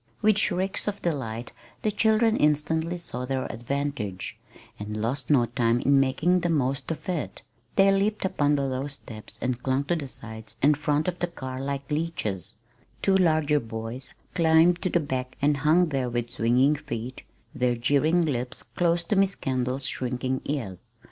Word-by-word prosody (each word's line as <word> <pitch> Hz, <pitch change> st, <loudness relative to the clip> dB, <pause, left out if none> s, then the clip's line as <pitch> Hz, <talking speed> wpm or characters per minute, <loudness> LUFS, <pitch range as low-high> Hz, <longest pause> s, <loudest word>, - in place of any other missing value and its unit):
With 215 Hz, -1 st, +5 dB
shrieks 190 Hz, 0 st, +1 dB
of 205 Hz, -1 st, -3 dB
delight 120 Hz, -8 st, -3 dB, 0.3 s
the 215 Hz, -, +2 dB
children 220 Hz, +1 st, +3 dB
instantly 160 Hz, +3 st, +1 dB
saw 125 Hz, -7 st, -5 dB
their 130 Hz, 0 st, -2 dB
advantage, 120 Hz, -7 st, -3 dB, 0.4 s
and 105 Hz, +1 st, -5 dB
lost 125 Hz, +4 st, -2 dB
no 135 Hz, -5 st, +5 dB
time 120 Hz, 0 st, +1 dB
in 140 Hz, +2 st, +4 dB
making 160 Hz, +7 st, +2 dB
the 175 Hz, -, -1 dB
most 135 Hz, -3 st, 0 dB
of 160 Hz, -, -5 dB
it. 175 Hz, -5 st, -3 dB, 0.3 s
They 195 Hz, 0 st, +6 dB
leaped 200 Hz, +1 st, +1 dB
upon 150 Hz, -6 st, +2 dB
the 140 Hz, -1 st, 0 dB
low 135 Hz, +1 st, -2 dB
step 115 Hz, -6 st, -8 dB
and 125 Hz, -1 st, -1 dB
clung 130 Hz, +1 st, +1 dB
to 175 Hz, +5 st, 0 dB
the 150 Hz, -4 st, -4 dB
sides 110 Hz, -3 st, -9 dB
and 145 Hz, +4 st, +4 dB
front 150 Hz, +1 st, 0 dB
of 180 Hz, -1 st, -2 dB
the 175 Hz, -, 0 dB
car 130 Hz, -6 st, -6 dB
like 140 Hz, +1 st, -4 dB
leeches. 110 Hz, -, -2 dB, 0.5 s
Two 195 Hz, -, +4 dB
larger 155 Hz, -5 st, +3 dB
boys 115 Hz, +2 st, -6 dB, 0.2 s
climbed 165 Hz, +1 st, +4 dB
to 185 Hz, -, 0 dB
the 175 Hz, -, +2 dB
back 130 Hz, -4 st, -3 dB
and 145 Hz, 0 st, +2 dB
hung 160 Hz, +4 st, +3 dB
there 135 Hz, -4 st, -1 dB
with 120 Hz, 0 st, -2 dB
swinging 125 Hz, +6 st, +3 dB
feet, 120 Hz, 0 st, -6 dB, 0.3 s
their 125 Hz, -3 st, +1 dB
jeering 145 Hz, +8 st, +2 dB
lips 125 Hz, -4 st, -3 dB
close 170 Hz, -1 st, 0 dB
to 205 Hz, -, -1 dB
Miss 195 Hz, 0 st, +3 dB
Kendall's 130 Hz, 0 st, -2 dB
shrinking 130 Hz, +1 st, -2 dB
ears. 115 Hz, -11 st, -5 dB
140 Hz, 170 wpm, -26 LUFS, 125-165 Hz, 0.5 s, They